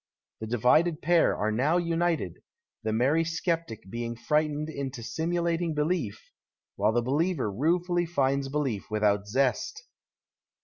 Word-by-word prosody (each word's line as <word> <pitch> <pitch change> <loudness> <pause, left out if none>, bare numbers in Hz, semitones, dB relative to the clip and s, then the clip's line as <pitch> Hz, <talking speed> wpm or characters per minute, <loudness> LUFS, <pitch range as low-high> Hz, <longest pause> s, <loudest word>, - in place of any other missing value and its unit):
The 110 - -5
divided 150 +9 +3
pair 170 +1 +3
are 110 +1 0
now 140 +10 +2
united, 170 - -1 0.4
the 110 - -2
merry 135 +9 +2
sceptic 165 - -2
being 115 +3 -4
frightened 150 +5 0
into 140 -5 -5
sinuilating 165 +5 -1
belief, 150 - -2 0.4
while - - +2
the 120 +1 +1
believer 145 - 0
ruefully 175 - +1
finds 140 -4 0
belief 135 -8 -2
without 105 -1 +1
zest. 140 - 0
145 Hz, 125 wpm, -28 LUFS, 115-165 Hz, 0.4 s, divided